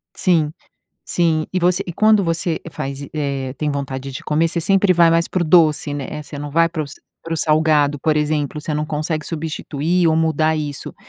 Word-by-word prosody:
Sim. 165 -5 +2 0.5
Sim. 160 -3 +1
E 185 - +1
você 180 0 +2
e 175 - -4
quando 215 +3 +4
você 165 -1 -1
faz 140 -1 -5
e 140 - -9
eh, 140 -3 -2
tem 150 - -1
vontade 135 -1 -4
de 130 - -7
comer, 155 +2 +1
você 170 +1 -1
sempre 195 +2 +3
vai 170 -1 +5
mais 165 0 +2
para 185 - -1
o - - 0
doce, 155 -3 +3
né? 145 -2 -4
Eh, 150 0 -6
você 145 0 -9
não 145 0 -6
vai 165 +3 +3
para 165 -2 -3
os 145 0 -9 0.3
para 165 - -3
o - - -3
salgado, 155 -2 +2
por 155 +1 +1
exemplo, 150 -1 -1
você 155 - -4
não 150 0 -1
consegue 155 +1 -3
substituir 165 +1 -1
ou 160 - +2
mudar 160 0 +1
isso. 145 -2 -5
155 Hz, 215 wpm, -19 LUFS, 145-165 Hz, 0.5 s, vai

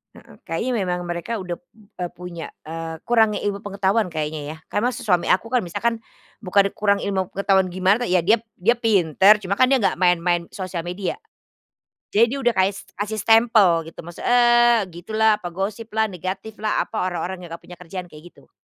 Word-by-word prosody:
Heeh, - - -16
kayaknya 195 +10 -2 0.2
memang 180 0 -2
mereka 175 +6 -4
udah 180 -5 -5
p 265 - -45 0.3
eee, 175 -1 -2
punya, 175 -2 -7 0.2
eee, 165 +1 -6
kurangnya 220 -3 +3
ilmu 200 -1 -1
pengetahuan 200 +1 0
kayaknya 155 -2 -4
ya, - - -15
karena 210 +4 +1
s - - -7
suami 180 -4 +1
aku 230 +5 +1
kan 250 - +3
misalkan, 230 +4 -2 0.4
bukan 200 0 +2
kurang 200 -1 +1
ilmu 190 -2 -1
pengetahuan 195 -1 +2
gimana 190 +6 +1
ya, 180 -1 +2
dia 215 +6 +4 0.2
dia 230 +7 +2
pintar 195 -3 +5
cuma 195 +2 -2
kan 255 - +6
dia 265 -1 +3
gak 195 - +1
main 180 -1 +4
main 175 -1 0
sosial 185 -3 -5
media, 180 - -4 0.9
jadi 225 +3 +5
dia 275 +3 -3
udah 240 -1 +3
kaes 190 0 0
kasih 210 +2 -4
stempel 220 -5 +4
gitu - - -17
maksud, 175 0 -10
eee, 240 -2 +4
gitulah, 215 +4 +1
apa 175 - -5
gosip 200 +5 -4
lah, 220 - +4
negatif 190 +2 -5
lah, 215 -1 0
apa, 220 - -4
orang-orang 180 +1 -4
yang 175 - -10
gak - - -37
punya 180 - -12
kerjaan, 180 +1 -7
kayak 165 0 -14
gitu. - - -23
195 Hz, 195 wpm, -22 LUFS, 175-220 Hz, 0.9 s, kan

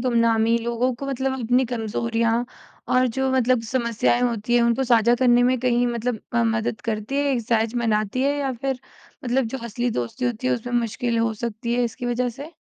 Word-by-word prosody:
गुमनामी 230 -2 +2
लोगों 235 +2 -1
को 275 +3 -7
मतलब 270 0 -1
अपनी 245 +3 +2
कमज़ोरियाँ 230 0 -1 0.4
और 255 0 +3
जो 265 +3 -1
मतलब 255 -2 +3
समस्याएँ 235 0 0
होती 240 -1 0
हैं, 240 - +5
उनको 235 +3 +2
साझा 235 -1 +4
करने 245 -1 +4
में 255 +1 +2
कहीं 245 -1 +2
मतलब 235 -1 -2
अ, 235 - +3
मदद 225 -1 -1
करती 220 +4 -3
है 285 - +2
ये 245 - 0
सहज 225 0 0
बनाती 225 0 0
है 285 +1 +1
या 275 -2 -1
फिर 260 +1 -3 0.4
मतलब 255 +2 +1
जो 265 +4 -5
असली 240 +2 -2
दोस्ती 125 - -3
होती 245 0 -2
है, - - +2
उसमें 245 +1 -3
मुश्किल 235 +1 -2
हो 230 0 +1
सकती 235 +1 -3
है, 245 0 +2
इसकी 240 +1 -4
वजह 245 +1 0
से? 280 +7 -9
240 Hz, 200 wpm, -23 LUFS, 230-255 Hz, 0.4 s, हैं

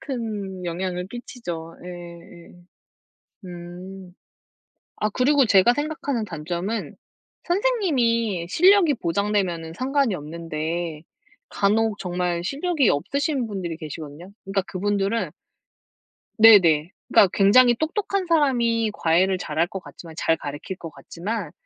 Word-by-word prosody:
큰 210 -8 -5
영향을 180 +1 -3
끼치죠. 175 -9 -7
예 - - -7
예. 170 -1 -11 1.0
음 180 +1 -10 0.8
아 215 - 0
그리고 270 +4 +3
제가 205 +3 +5
생각하는 290 -5 -2
단점은 175 +4 -4 0.5
선생님이 255 - +1
실력이 360 - +5
보장되면은 175 -3 -1
상관이 265 +1 0
없는데 160 0 -4 0.5
간혹 215 +1 +1
정말 175 -1 -2
실력이 290 - 0
없으신 275 - -1
분들이 185 -5 -4
계시거든요. 155 +3 -9
그러니까 195 0 0
그분들은 205 +3 -1 1.1
네 220 -2 +9
네. 160 -1 +1 0.2
그니까 195 - +5
굉장히 240 +5 +5
똑똑한 385 - -1
사람이 240 -9 +2
과외를 185 +1 +2
잘할 170 -1 -1
것 195 - -6
같지만 165 -2 -12
잘 165 - +2
가르칠 145 +6 -7
것 165 - -8
같지만 175 +8 -5
195 Hz, 270 characters per minute, -23 LUFS, 170-240 Hz, 1.1 s, 네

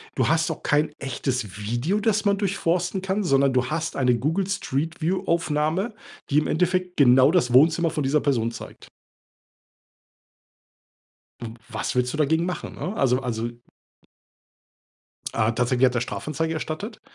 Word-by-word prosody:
Du - - +1
hast 160 0 +2
auch - - -7
kein 150 +1 +1
echtes 125 -6 -3
Video, 120 - -1
das 215 0 +1
man 200 -1 +3
durchforsten 185 -2 -1
kann, 190 +2 -1
sondern 135 -5 +3
du 125 0 +1
hast 160 +3 -3
eine 125 -2 +2
Google 165 - -1
Street 165 -3 -3
View 185 +4 0
Aufnahme, 165 +5 0 0.4
die 145 - +2
im 150 - -2
Endeffekt 180 +2 0
genau 130 +1 +6
das 125 -10 +1
Wohnzimmer 165 +5 +5
von 155 -2 -2
dieser 140 +3 +2
Person 115 -5 0
zeigt. 115 - -11 2.5
W 115 -1 -6 0.2
was - - -3
willst 125 0 +1
du 155 - -3
dagegen 160 +3 +2
machen, 180 0 -5
ne? 195 - -4
Also 130 - +2
also 120 -2 -3 1.8
Ah, 110 0 +1
tatsächlich 125 +2 +2
hat 125 - +1
er 120 - +1
Strafanzeige 160 +5 -3
erstattet, 180 +9 -5
155 Hz, 150 wpm, -24 LUFS, 125-180 Hz, 2.5 s, genau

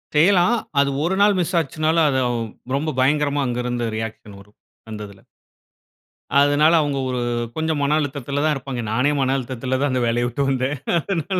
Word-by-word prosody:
செய்யலாம். 180 +7 +4 0.2
அது 140 0 +3
ஒரு 175 +4 0
நாள் 205 -1 +4
மிஸ் 180 +1 -1
ஆச்சுன்னாலும் 155 +1 +1
அது 130 -2 +1
அவ் 120 -1 -1 0.4
ரொம்ப 155 +1 -2
பயங்கரமா 145 +1 +1
அங்கு 125 0 -2
இருந்து 120 -1 -2
ரியாக்‌ஷன் 110 -2 -7
வரும். 105 +1 -19 0.3
அந்ததுல. 105 -2 -8 1.2
அதனால 145 +3 +4
அவங்க 145 -2 -1
ஒரு 125 -1 -2 0.3
கொஞ்சம் 160 -1 -1
மன 145 +2 +2
அழுத்தத்துல 145 0 -3
தான் 155 - +3
இருப்பாங்க. 130 -2 -5
நானே 125 +6 +2
மன 135 0 +1
அழுத்தத்துல 130 +1 -3
தான் 145 - +1
அந்த 130 -1 0
வேலய 120 +1 +1
விட்டு 140 +4 -1
வந்தேன். 130 +2 -1 0.2
அதனால. 185 +1 -2
140 Hz, 170 wpm, -21 LUFS, 125-155 Hz, 1.2 s, செய்யலாம்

